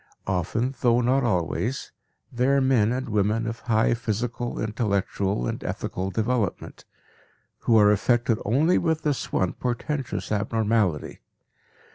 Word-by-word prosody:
Often, 105 +8 -1
though 120 -1 +4
not 130 +3 +2
always, 115 - -1 0.4
they 125 +1 +1
are 140 0 +4
men 130 -5 +3
and 130 +1 -2
women 105 +1 +1
of 115 0 -4
high 115 -1 +2
physical, 120 +1 -3
intellectual 100 - -1
and - - -4
ethical 95 +1 -3
development, 110 0 -2 0.7
who 115 - +3
are 105 -1 +6
affected 115 +2 +2
only 145 - +3
with 160 -2 0
this 145 -3 -1
one 95 -2 0
portentous 125 +2 -3
abnormality. 105 -5 0
115 Hz, 125 wpm, -25 LUFS, 105-125 Hz, 0.7 s, are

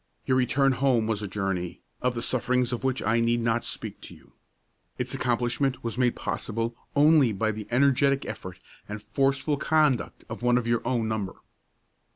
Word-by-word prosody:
Your 130 - +2
return 130 +2 +3
home 130 -3 +2
was 110 -1 -1
a 105 - -3
journey, 95 -3 -3 0.2
of 125 -1 0
the 115 - -3
sufferings 125 0 +1
of 120 - -4
which 130 -1 0
I 110 +3 +2
need 115 +1 +2
not 115 0 +1
speak - - -5
to - - -10
you. - - -21 0.6
Its - - -2
accomplishment 125 +2 0
was 115 -1 -3
made 125 -1 +2
possible 115 +1 -3 0.2
only 145 -3 +5
by 110 +2 0
the 105 -1 -7
energetic 140 +2 +3
effort 95 -1 -7 0.3
and 105 0 -6
forceful 135 +4 0
conduct 150 -4 +1
of - - -7
one 120 0 +3
of 125 - -1
your 115 0 +1
own 120 -3 0
number. 105 -4 -2
120 Hz, 180 wpm, -26 LUFS, 110-130 Hz, 0.6 s, only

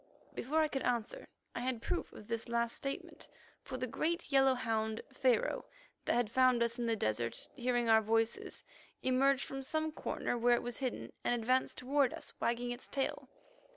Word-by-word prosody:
Before 305 +6 +1
I 310 - +3
could 270 -3 -3
answer, 245 - -1 0.3
I - - -3
had 250 -1 -1
proof - - -2
of 210 - -12
this 230 0 -3
last 235 0 +1
statement, 275 0 -5 0.3
for 260 - -6
the 255 - -1
great 320 +7 -1
yellow 270 -1 +5
hound, 220 -2 -1
Pharaoh, 250 -4 +2 0.4
that - - +2
had 240 -3 +1
found 255 -1 +5
us 235 +1 -1
in 235 - 0
the 225 - +2
desert, 115 - -1
hearing 245 -2 0
our 220 -1 +6
voices, 225 +1 0 0.4
emerged 265 +1 +3
from 270 0 -5
some 315 +3 -1
corner 245 -5 -2
where 240 +1 +5
it - - -2
was 240 -1 -4
hidden, 255 -3 -3
and 240 - +1
advanced 255 +3 +1
toward 270 0 +2
us, - - -9
wagging 240 +1 0
its 245 +1 -6
tail. 270 -1 -2
245 Hz, 185 wpm, -34 LUFS, 230-265 Hz, 0.4 s, our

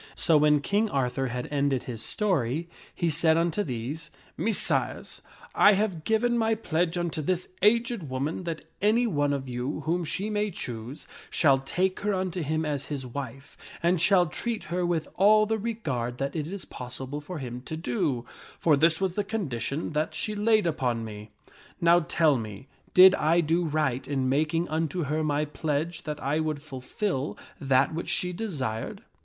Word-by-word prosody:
So 165 - +3
when 150 -1 +5
King 210 +7 +1
Arthur 135 -2 0
had 125 0 -4
ended 140 -3 +1
his 115 -3 -6
story, 165 - 0 0.3
he 170 -2 0
said 160 +1 +3
unto 170 +4 +1
these, 145 - -4
" - - -29
Messires, 220 -2 0 0.3
I 205 - +6
have 190 -6 -1
given 235 +2 +2
my 225 0 +2
pledge 175 -4 -1
unto 170 -2 -1
this 180 +4 -1
aged 230 - +2
woman 140 +7 -2
that 165 -2 -4 0.2
any 220 +4 +3
one 145 -9 +1
of 135 -2 -2
you 125 +5 -3
whom 170 +4 0
she 195 +6 -2
may 210 0 0
choose, 120 - -6 0.2
shall 135 -4 +4
take 185 +8 -1
her 205 -1 0
unto 185 -1 -2
him 155 +1 -1
as 145 -2 -2
his 140 -3 -4
wife, 135 +1 -7 0.3
and 170 0 +3
shall 180 -1 +5
treat 225 +8 -3
her 180 0 0
with 165 -3 -1
all 215 +2 +6
the 220 +1 -1
regard 140 - -3
that 140 +3 -3
it 155 -2 -2
is 195 +2 -6
possible 130 +3 -6
for 175 +4 -7
him 125 -3 -6
to 160 - -5
do; 125 -3 -1 0.3
for 155 -3 +4
this 160 +3 +4
was 190 -2 0
the 205 - 0
condition 160 - -3
that 155 +1 -1
she 215 - -2
laid 215 0 +3
upon 125 -8 0
me. 105 0 -8 0.5
Now 170 +1 +5
tell 155 -3 +2
me, 110 +3 -8 0.3
did 185 +1 +10
I 165 -1 +3
do 165 +2 +1
right 150 -5 0
in 135 -2 0
making 155 +5 +1
unto 160 +2 -1
her 155 +2 -1
my 150 0 +1
pledge 160 +3 -3
that 150 -1 -4
I 145 +4 +1
would 155 -2 -1
fulfil 140 +2 -3 0.2
that 135 +1 +2
which 165 - -4
she 180 0 0
desired 140 - -4
155 Hz, 180 wpm, -27 LUFS, 135-185 Hz, 0.5 s, did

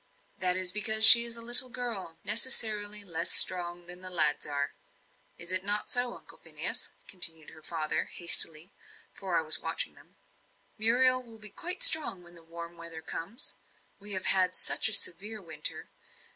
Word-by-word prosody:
"That 180 0 -2
is 185 -1 -2
because 220 +2 +3
she 235 0 +12
is 235 0 -5
a 230 - -6
little 245 +2 +3
girl, 230 -9 -7
necessarily 215 -3 -2
less 170 -3 -5
strong 175 -1 +2
than 180 +1 -7
the 185 - -6
lads 160 -4 0
are. 145 -1 -6 0.6
Is 170 +1 -5
it 185 0 +2
not 205 +1 -3
so, 245 -1 -2
Uncle - - -16
Phineas?" - - -3 0.2
continued 165 -4 -1
her 155 - -18
father, 155 -1 -5
hastily, 170 0 +3 0.4
for 185 -3 -6
I 160 - -3
was 155 0 0
watching 165 - -5
them. - - -23 0.6
"Muriel 255 +3 0
will 230 -3 -18
be 210 -1 -2
quite 360 - -6
strong 310 - +3
when 175 0 -16
the 170 - -18
warm 170 +1 -13
weather 165 -1 -12
comes. 200 - -5 0.4
We 205 0 -7
have 185 - -5
had 185 -1 +2
such - - 0
a - - -3
severe 210 +3 0
winter. 160 -5 -5
185 Hz, 170 wpm, -26 LUFS, 170-225 Hz, 0.6 s, she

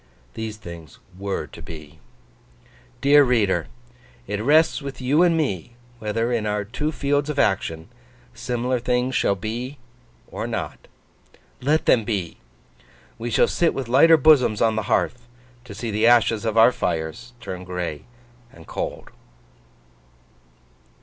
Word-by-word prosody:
These 110 -1 -5
things 85 -6 -11 0.2
were 100 +1 -3
to - - -13
be. 75 -2 -11 1.0
Dear 145 +1 +6
reader! 105 - +1 0.6
It 105 +7 -3
rests 155 +6 +3
with 140 -2 -7
you 135 +5 +2
and 170 -2 +4
me, 120 - -2 0.2
whether, 115 +2 -1
in 110 -3 -1
our 105 0 -1
two 135 +9 -3
fields 145 0 0
of 150 - -3
action, 80 -7 0 0.5
similar 120 +2 -2
things 125 +2 0
shall 100 -3 +2
be 120 +7 -5 0.5
or - - -4
not. - - -5 0.7
Let 150 +5 +1
them 115 - +4
be! 100 -6 -3 0.8
We 120 +1 -3
shall 110 - +3
sit 170 - +1
with 135 -3 -4
lighter 150 +7 +6
bosoms 130 -7 +4
on 110 -1 +2
the 110 - -3
hearth, 120 -1 0 0.4
to 100 - -10
see 115 +2 -4
the 110 +2 +2
ashes 115 -2 +4
of 110 0 -1
our 115 +2 +7
fires 115 +6 -3
turn 90 -5 -7
gray 90 -5 -5 0.5
and 80 -1 -15
cold. - - -5
115 Hz, 140 wpm, -23 LUFS, 100-130 Hz, 1.0 s, our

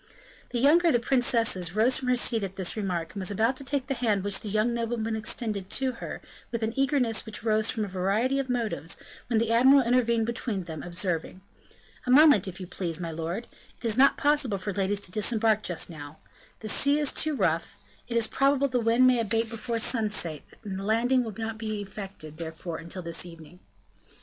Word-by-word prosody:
The 245 - -3
younger 310 +8 +5
of 330 - +4
the 240 - +3
princesses 230 -8 +1
rose 235 +4 +3
from 260 - -4
her 250 - +3
seat 235 -2 +3
at 195 -1 -5
this 190 -2 0
remark, 180 -6 -3
and 200 - -6
was 185 - 0
about 220 +5 +1
to 275 - -4
take 275 0 -1
the 270 - -2
hand 220 -6 0
which 200 -1 -2
the 210 - -6
young 215 +3 +1
nobleman 230 -1 -2
extended 215 -3 -3
to 265 -1 +1
her, - - -6 0.3
with 235 -2 -3
an 220 +1 -1
eagerness 270 -5 +1
which 220 -2 -6
arose 220 -1 +2
from 215 -2 0
a - - -7
variety 200 +8 0
of 270 -1 -3
motives, 225 -9 -2 0.3
when 235 - +1
the 225 0 +1
admiral 265 +4 +6
intervened 235 -2 +2
between 230 -4 -3
them, 160 -3 -7
observing: 175 0 -3 0.7
"A - - -1
moment, 270 - +6
if 190 0 -7
you 185 - -6
please, 175 -2 -3
my 170 -2 -4
lord; 165 +8 -4 0.3
it - - -11
is 220 -2 +2
not 270 +3 +5
possible 290 -8 +2
for 195 +2 -4
ladies 200 +1 0
to 180 - -4
disembark 215 +1 +2
just 175 -5 -1
now, 150 -3 -10 0.4
the 220 - -6
sea 280 +6 +3
is 295 -2 +1
too 310 -1 0
rough; - - -1 0.3
it 235 - -1
is 230 - +3
probable 275 +3 +2
the 250 -1 0
wind 230 +2 +3
may 255 -1 +5
abate 225 +1 0
before 230 +1 -3
sunset, 210 - 0 0.2
and 195 -3 -5
the - - -5
landing 240 +5 +2
will 220 -4 -6
not 225 0 -4
be 215 -2 -3
effected, 195 -6 -8
therefore, 165 0 -6
until 170 +3 -6
this 170 -1 -2
evening." 165 0 -12
220 Hz, 210 wpm, -27 LUFS, 190-245 Hz, 0.7 s, admiral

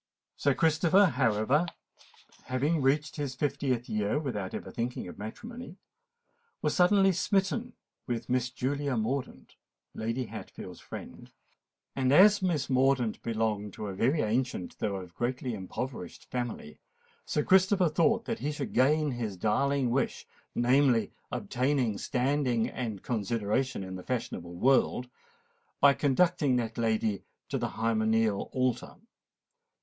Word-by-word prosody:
Sir 140 -2 +1
Christopher, 165 +5 +4
however, 130 - +2 0.8
having 145 +5 0
reached 145 +4 +1
his 140 -3 -3
fiftieth 135 -3 -1
year 105 +3 0
without 110 -11 -3
ever - - -6
thinking 120 -4 -3
of 90 - -10
matrimony, 230 - -8 0.8
was - - 0
suddenly 195 +2 +5
smitten 200 +6 0 0.3
with 120 -2 -3
Miss 125 -1 +1
Julia 140 +1 -2
Mordaunt, 125 +5 -3 0.4
Lady 115 +3 -2
Hatfield's - - -9
friend; - - -10 0.6
and 130 -1 +1
as 200 +6 +7
Miss 165 -7 0
Mordaunt 130 -3 +2
belonged 110 -3 -1
to - - -6
a - - -5
very 130 - +2
ancient 110 -4 -2
though 100 -2 -1
a 95 - -6
greatly 120 +7 -3
impoverished 105 0 -6
family, 120 -11 -4 0.5
Sir 150 - 0
Christopher 190 +1 +4
thought 165 +7 +2
that 230 - -3
he 150 - -2
should 150 - -5
gain 150 +3 +3
his 115 -6 -4
darling 135 +6 +1
wish—namely, 125 -1 +1 0.2
obtain 125 -4 0
standing 130 -3 +1
and 110 -6 -5
consideration 115 +1 -1
in 95 0 -6
the 90 - -9
fashionable 85 -8 -4
world—by 145 - +1
conducting 145 0 +2
that 115 -1 -2
lady 110 -3 0 0.3
to - - -1
the - - -1
hymeneal 110 -2 +1
altar. 130 -2 -1
130 Hz, 125 wpm, -29 LUFS, 110-150 Hz, 0.8 s, as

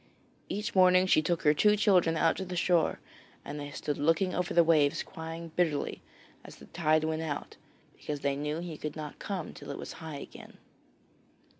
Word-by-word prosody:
Each 210 +3 -3
morning 185 -1 +5
she 180 - +4
took 170 +2 -1
her 150 -1 +5
two 210 +7 +4
children 185 -6 +3
down - - +3
to 190 - -5
the 180 -1 -6
shore 170 -2 +2 0.5
and 145 +1 -6
they 145 0 -6
stood 145 0 -4
looking 165 +5 +2
over 180 -1 -1
the 170 - +5
waves 155 -3 +3
crying 165 -1 -8
bitterly 160 -5 0 0.4
as - - -12
the - - -14
tide 155 -2 +1
went 160 0 -1
out, 155 -3 -5 0.4
because 145 -1 -5
they 140 -1 0
knew 150 +3 -3
he 170 -3 -7
could 150 -1 -5
not 150 -2 -7
come 190 -6 -4
till - - -11
it - - -5
was - - -7
high 160 -3 -6
again. - - -11
160 Hz, 190 wpm, -30 LUFS, 150-180 Hz, 0.5 s, morning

